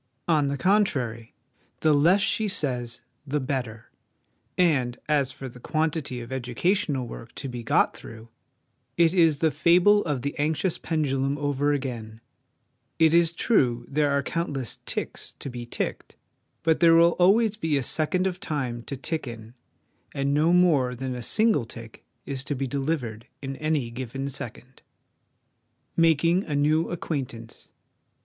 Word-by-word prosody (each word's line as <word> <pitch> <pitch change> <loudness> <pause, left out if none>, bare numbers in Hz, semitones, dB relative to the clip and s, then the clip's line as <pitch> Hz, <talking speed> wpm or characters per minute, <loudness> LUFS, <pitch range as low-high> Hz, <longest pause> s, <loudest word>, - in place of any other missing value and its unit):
On 155 -4 +3
the 140 0 -2
contrary, 130 - 0 0.5
the 155 -1 +4
less 170 +8 +4
she 215 +2 +1
says 125 - -2 0.3
the 150 +2 0
better; 125 -5 -4 0.7
and 135 -9 +2
as 145 -3 +1
for 135 - -8
the 125 0 -12
quantity 155 -3 -2
of 120 +2 -10
educa 130 +6 0
tional 150 -11 0
work 115 0 -10
to 140 - -5
be 125 -2 -6
got 115 - +2
through, 110 0 -11 0.7
it 170 0 +4
is 165 -5 +3
the 160 -1 +3
fable 175 +8 +4
of 145 -6 -2
the 140 - -2
anxious 155 +4 0
pendulum 140 -3 -1
over 145 0 0
again: 120 -6 -4 0.8
it 160 -1 +4
is 170 -1 +4
true 125 - +1
there 145 +1 +1
are 140 0 +1
countless 145 -7 -3
'ticks' - - -4
to 135 - -7
be 120 -1 -7
ticked, - - -4 0.5
but 160 0 +2
there 165 -1 +6
will 170 +1 +6
always 210 +4 +4
be 160 -8 0
a 135 - -1
second 165 +7 +1
of 185 -1 -2
time 135 -10 -3
to 140 - -5
tick 155 +2 -3
in, 115 -1 -9 0.6
and 140 0 0
no 155 +3 +3
more 155 -9 +3
than 130 +1 -4
a 125 - -5
single 215 - +2
tick 115 -1 -11 0.2
is 135 -2 -4
to 145 - -3
be 135 +1 -2
delivered 135 -5 -3 0.2
in 135 0 -4
any 150 -6 -1
given 130 +3 -5
second. 130 -2 -7 1.1
Making 165 +2 +3
a 150 - -3
New 155 +3 +2
Acquaintance. 130 -9 -5
145 Hz, 155 wpm, -26 LUFS, 125-165 Hz, 1.1 s, there